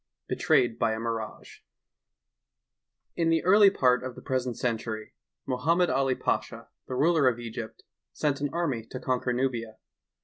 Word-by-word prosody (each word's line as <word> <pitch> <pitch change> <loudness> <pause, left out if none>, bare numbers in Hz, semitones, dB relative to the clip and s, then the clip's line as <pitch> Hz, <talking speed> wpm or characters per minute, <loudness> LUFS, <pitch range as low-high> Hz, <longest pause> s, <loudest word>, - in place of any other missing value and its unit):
'' - - -60
BETRAYED 120 -2 +2
BY 115 -1 +2
A 110 - -4
MIRAGE 115 -1 -5 1.5
N 165 -1 +2
the 165 -1 +2
early 200 +2 +7
part 125 -9 +2
of 130 -1 -6
the - - -10
present 130 -2 -1
een 120 -2 +1
tury, 110 -1 -6 0.3
Mohammed 165 +8 +1
AH 135 -1 +1
Pasha, - - -3 0.2
the 130 - -4
ruler 155 +1 +3
of 120 -2 +2
Egypt, 115 -1 -7 0.3
sent 140 - -1
an 145 - 0
army 155 -10 -1
to 130 +3 -8
eonquer 125 -1 -1
Nubia. 120 -4 -2
125 Hz, 160 wpm, -28 LUFS, 115-145 Hz, 1.5 s, early